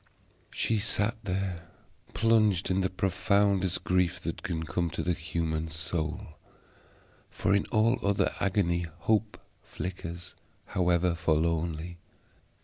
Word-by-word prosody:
She 110 -2 0
sat 105 +2 0
there 90 -3 -2 0.5
plunged 105 -3 +3
in 95 +1 +2
the 95 - +1
profoundest 95 0 +1
grief 90 0 +1
that - - -4
can 80 -1 -3
come 85 +3 -1
to 80 - -3
the 90 - +1
human 80 -1 -2
soul, 80 +2 -3 0.9
for 95 - 0
in 100 - +2
all 115 +3 +2
other 100 -2 +1
agony 90 -3 +1
hope 110 +2 +1 0.2
flickers, 85 -1 -6 0.3
however 90 -2 +2
forlornly. 85 0 0
90 Hz, 115 wpm, -29 LUFS, 85-100 Hz, 0.9 s, plunged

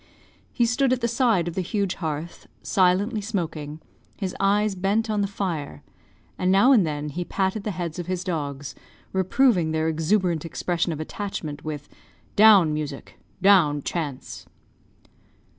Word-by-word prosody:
He 240 - +2
stood 245 +3 +1
at 255 -1 +1
the 235 - +1
side 230 -7 +2
of 170 - -3
the 185 - -1
huge 195 +1 -1
hearth, 160 0 -5 0.2
silently 200 +4 +2
smoking, 160 -7 -4 0.4
his 190 -3 -4
eyes 205 +1 +2
bent 200 +4 0
on 210 -1 0
the 200 - +1
fire, 165 - -4 0.6
and 185 0 +2
now 200 +8 +5
and 210 -11 +5
then 150 0 -3
he 175 +5 -4
patted 190 +3 -1
the - - -1
heads 170 -2 -4
of 175 - -5
his 185 -1 -2
dogs, 145 -6 -4 0.4
reproving 190 -1 +2
their 160 0 0
exuberant 165 +1 +1
expression 170 +1 -2
of 155 - -4
attachment, 155 -4 -5
with 150 -2 -5 0.5
"Down, 200 -7 +7
Music; 150 -2 -6 0.2
down, 160 -8 +5
Chance!" 150 -7 -5
180 Hz, 150 wpm, -24 LUFS, 155-205 Hz, 0.6 s, Down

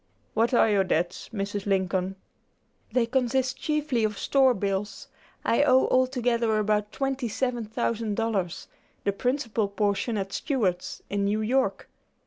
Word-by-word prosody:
"What 225 +2 +2
are 235 - +5
your 205 -3 +3
debts, 175 -1 -1
Mrs. 205 -1 -3
Lincoln?" 190 -1 0 0.8
"They 250 -2 +2
consist 260 +1 0
chiefly 300 -6 0
of 210 -1 0
store 265 +3 +3
bills. 200 +1 -3 0.4
I 235 - +3
owe 260 -2 +5
altogether 245 -3 +2
about 210 0 +1
twenty 270 -2 -2
seven 240 +1 -1
thousand 225 -1 -2
dollars; 200 -6 -2 0.4
the 200 - +1
principal 240 -2 0
portion 205 +2 0
at 195 -1 -3
Stewart's, 195 - -1
in 200 0 0
New 210 +2 +1
York. 260 +5 0
220 Hz, 135 wpm, -26 LUFS, 200-255 Hz, 0.8 s, are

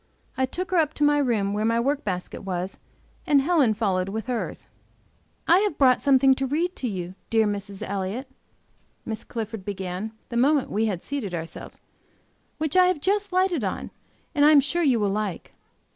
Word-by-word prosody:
I 260 - +1
took 365 +8 -5
her 370 - +2
up 310 -2 +2
to 295 - 0
my 290 0 +4
room 220 -7 +1
where 210 +1 -1
my 230 +1 +2
work 280 +4 0
basket 180 -3 -4
was, 185 -1 -4 0.5
and 290 -2 +5
Helen 275 -7 +3
followed, 195 -4 0
with 220 +2 -4
hers. 245 -2 -4 0.8
"I 345 +3 +6
have 405 -6 0
brought 255 -3 +4
something 270 -1 +5
to 270 0 -2
read 335 +7 -1
to 255 - -2
you, 185 -4 -4 0.2
dear 225 -1 +3
Mrs. 200 -1 -4
Elliott," 200 +7 -3 0.8
Miss 220 -1 -4
Clifford 225 -3 -5
began, 190 +2 -4 0.2
the 235 - -3
moment 280 +3 +3
we 220 +2 +1
had 185 -5 -3
seated 255 -11 -4
ourselves, 165 0 -8 0.8
"which 310 0 -2
I 365 -1 +6
have 365 -4 +1
just 400 +4 0
lighted 365 - +1
on, 190 - -3 0.4
and 290 -3 +2
I 295 - +8
am 305 -2 +8
sure 300 +5 0
you 265 -8 +3
will 205 -2 +1
like. 205 -4 -3
240 Hz, 190 wpm, -25 LUFS, 200-295 Hz, 0.8 s, I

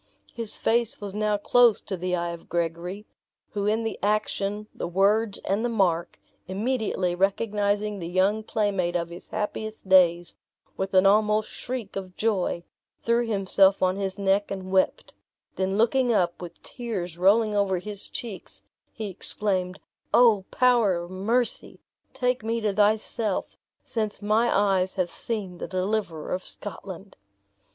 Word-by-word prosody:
His 230 -2 +1
face 235 0 +1
was 200 -2 -6
now 210 0 +1
close 240 +2 +4
to 190 - -4
the 180 0 -1
eye 170 0 -2
of 170 -1 -10
Gregory, 170 +4 -3 0.5
who 205 -1 -2
in 220 +2 +1
the 225 - -3
action, 210 0 -1
the - - -4
words, 200 +4 +2
and 200 +4 0
the 240 - +1
mark, 180 -6 0 0.3
immediately 200 -3 -1
recognizing 205 +2 0
the 170 - -5
young 190 +5 +2
playmate 200 -5 -1
of 170 -1 -1
his 175 +1 -10
happiest 215 0 -4
days, 175 -2 +4 0.4
with 190 0 -3
an 185 +1 +6
almost 210 +1 +3
shriek 245 -5 -6
of 185 -2 -6
joy, 195 -5 0 0.4
threw 235 0 +2
himself 195 -2 +3
on 185 0 +3
his 195 -1 -3
neck 200 +1 +1
and 190 -1 -5
wept; 190 -1 +1 0.4
then 190 +1 -1
looking 245 +2 +3
up, 180 -6 +1
with 175 -1 -9
tears 185 -9 -5
rolling 210 +4 +4
over 200 -2 +1
his 200 +2 -6
cheeks, 190 - -8 0.3
he 220 -2 -5
exclaimed, 185 -1 -2 0.4
"O 225 -6 +5
Power 240 -7 +3
of 175 +1 -5
Mercy, 225 +6 0 0.3
take 250 -2 -1
me 230 +1 -1
to 210 -2 0
thyself, 210 0 0 0.3
since 215 -2 -3
my 215 +3 +2
eyes 195 -2 +2
have 180 -2 -1
seen 195 -6 -4
the - - -4
deliverer 185 -4 -2
of 185 - -3
Scotland!" 195 -1 -9
200 Hz, 150 wpm, -26 LUFS, 185-220 Hz, 0.5 s, an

